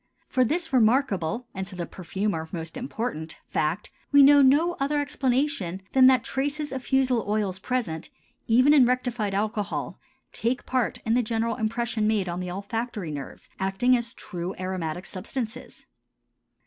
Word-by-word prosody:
For 255 - +2
this 325 +4 -1
remarkable 235 - +2
and 190 -1 -4
to 190 - -8
the 175 -1 -3
perfumer 185 -2 -3
most 165 +1 -6
important 235 - -4
fact 160 +6 -1 0.2
we 285 -1 +8
know 285 +1 +8
no 295 +6 +4
other 285 +2 +1
explanation 260 - -1
than 260 -1 +7
that 260 -1 +5
traces 290 +2 -2
of 265 -1 -4
fusel 260 -4 +2
oils 205 -3 -1
present 190 -9 -3 0.4
even 255 +6 +5
in 265 -5 +6
rectified 245 -5 -1
alcohol 210 0 -2 0.3
take 240 +3 -1
part 255 -2 0
in 225 - +2
the 245 - +4
general 230 0 -1
impression 225 0 -1
made 210 -4 +1
on 175 0 -3
the 180 0 -4
olfactory 200 -1 -4
nerves, 140 -2 -8
acting 195 +7 +2
as 235 0 -4
true 180 -1 -6
aromatic 185 -2 -3
substances. 235 +5 -6
225 Hz, 150 wpm, -26 LUFS, 190-260 Hz, 0.4 s, we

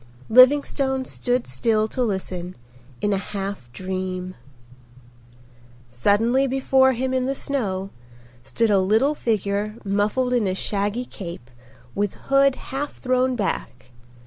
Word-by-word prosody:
Livingstone 265 +1 +4
stood 250 -1 -1
still 215 - +1
to 255 - -3
listen, 185 -5 -3 0.5
in 205 - +1
a 195 - 0
half 195 -10 -5
dream. 185 +3 -4 1.6
Suddenly 225 - +2
before 265 0 +3
him 260 +2 -2
in 255 0 0
the 275 - -1
snow 200 -10 -2 0.5
stood 220 - 0
a 200 - +5
little 220 +10 +3
figure 210 -4 -1
muffled 210 +6 +1
in 235 -5 +2
a 185 - -1
shaggy 205 +5 -2
cape 170 - -9 0.4
with 205 -1 -1
hood 275 -1 +3
half 280 +2 -5
thrown 255 0 0
back. 130 - -4
215 Hz, 120 wpm, -23 LUFS, 190-260 Hz, 1.6 s, a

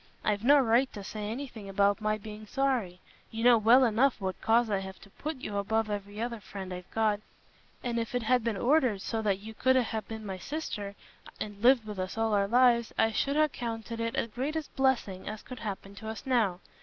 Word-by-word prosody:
I've 210 0 +1
no 285 +4 +7
right 255 0 +3
to 205 - -7
say 210 +1 -5
anything 230 -4 -6
about 200 +2 +2
my 215 0 +1
being 215 0 -9
sorry: 240 -9 -1 0.3
you 225 0 -4
know 240 -1 +7
well 235 +5 +6
enough 240 +3 +2
what 190 -2 -4
cause 230 +1 +3
I 200 -3 0
have 190 0 -8
to 200 - -16
put 310 +8 -5
you 210 -5 -5
above 215 +2 0
every 205 0 -5
other 235 0 -3
friend 190 -2 -7
I've 180 0 -8
got; 215 -2 +1 0.6
and 235 -1 -1
if 230 +2 -3
it 245 - 0
had 245 +1 +3
been 225 -3 -1
ordered 245 -5 +2
so 225 -1 -2
that 200 -3 +1
you 215 +3 -9
could 260 +4 +3
ha' 240 -3 +1
been 220 -1 -7
my 190 -2 -5
sister, 210 - -5 0.4
and 205 -1 -6
lived 245 -1 +5
with 210 -3 -6
us 185 +3 -4
all 225 -1 +1
our 200 -1 +3
lives, 240 0 +4
I 225 0 +3
should 280 +5 0
ha' 310 0 +4
counted 230 -1 -5
it 230 0 -2
the - - +1
greatest 285 +7 -4
blessing 245 -8 0
as 215 0 -7
could 255 -3 -9
happen 200 -2 -6
to 220 +2 -7
us 220 - -7
now. 220 -9 +1
220 Hz, 220 wpm, -30 LUFS, 205-245 Hz, 0.6 s, no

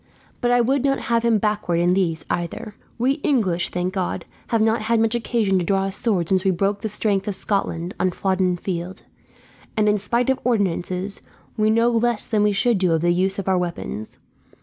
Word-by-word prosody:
But 240 - +1
I 245 0 +4
would 265 +3 +1
not 275 -1 +2 0.2
have 230 - +3
him 230 -1 +3
backward 210 -5 0
in 175 +1 +3
these, 170 -4 0
either. 175 +5 -4 0.2
We 265 +5 +1
English, 195 - +1
thank 180 +1 -2
God, 185 -3 -2 0.2
have 230 - +1
not 220 +1 +2
had 225 +1 +1
much 225 0 +2
occasion 225 -5 +1
to - - -1
draw 195 +2 +1
a 195 - -2
sword 190 -5 0
since 190 0 +2
we 195 - +2
broke 195 +3 0
the 220 - -2
strength 205 -1 0
of 205 - 0
Scotland 180 -3 -1
on 185 - +2
Flodden 185 -1 0
Field; 175 0 -5 0.7
and 210 -1 +3
in 210 0 +3
spite 235 +5 +1
of 265 - -1
ordinances, 195 -4 -1 0.3
we 215 -2 +2
know 230 +2 +3
less 235 -1 0
than 215 -2 +1
we 210 0 +3
should 220 +1 +1
do 180 -3 +2
of 160 - +1
the 175 +1 +3
use 190 +2 0
of 200 - -4
our 190 -1 +3
weapons. 170 -11 -5
200 Hz, 210 wpm, -22 LUFS, 180-230 Hz, 0.7 s, I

